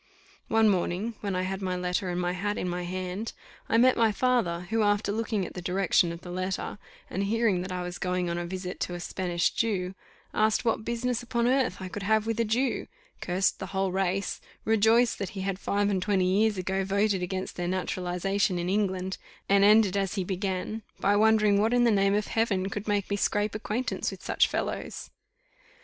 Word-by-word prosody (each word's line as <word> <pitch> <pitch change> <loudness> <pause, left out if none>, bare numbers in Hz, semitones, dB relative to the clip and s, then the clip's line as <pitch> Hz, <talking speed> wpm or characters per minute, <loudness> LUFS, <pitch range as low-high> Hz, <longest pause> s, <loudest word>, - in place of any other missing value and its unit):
One 225 0 +4
morning, 195 +3 0
when 200 -2 -2
I 185 - 0
had 190 +1 -3
my 185 -1 -1
letter 180 +1 -1
and 175 0 -2
my 175 0 0
hat 205 +3 -2
in - - -2
my 180 0 -2
hand, 185 +4 -4 0.4
I 225 - +3
met 255 +2 +5
my 225 -2 +3
father, 215 -7 +1
who 225 0 +2
after 205 0 +2
looking 215 -2 -1
at - - -8
the 180 - -6
direction 180 -1 +2
of 170 0 -8
the 180 - -8
letter, 185 +3 -3 0.3
and 195 +2 -2
hearing 215 -3 +2
that 185 +1 -5
I 180 -1 -3
was 180 0 -6
going 180 -1 -1
on 170 0 -2
a 175 - -4
visit 185 0 -5
to 175 - -2
a - - -5
Spanish 175 -1 -1
Jew, 190 -5 -1 0.4
asked 215 +2 +2
what 225 -1 +1
business 235 +1 -1
upon 235 -1 -1
earth 255 -7 +2
I 190 - -5
could 200 +3 -6
have 215 +2 +2
with 225 0 -2
a - - +4
Jew 240 +4 0 0.3
cursed 185 +1 +1
the 190 - -5
whole 190 -1 +1
race 190 +1 -1 0.2
rejoiced 225 +2 +4
that 195 - -3
he - - -2
had 195 0 -2
five 205 0 0
and 190 -2 0
twenty 190 -1 +2
years 205 +3 +2
ago 190 +1 -1
voted 200 0 +1
against 185 +1 -3
their 175 0 -2
naturalization 185 +1 -1
in 175 +1 -2
England, 190 -2 -1 0.3
and 200 0 +4
ended 210 -2 +5
as 195 -1 0
he 195 - 0
began, 190 +3 -3 0.2
by 205 - +3
wondering 215 -1 +4
what 225 +3 +2
in 245 - +4
the 235 - +4
name 195 -1 +3
of 210 0 0
Heaven 195 -4 0
could 205 +1 -5
make 205 -2 0
me 200 - +1
scrape 205 +1 0
acquaintance 215 +4 -2
with - - -9
such - - +3
fellows. - - -4
195 Hz, 210 wpm, -28 LUFS, 185-215 Hz, 0.4 s, met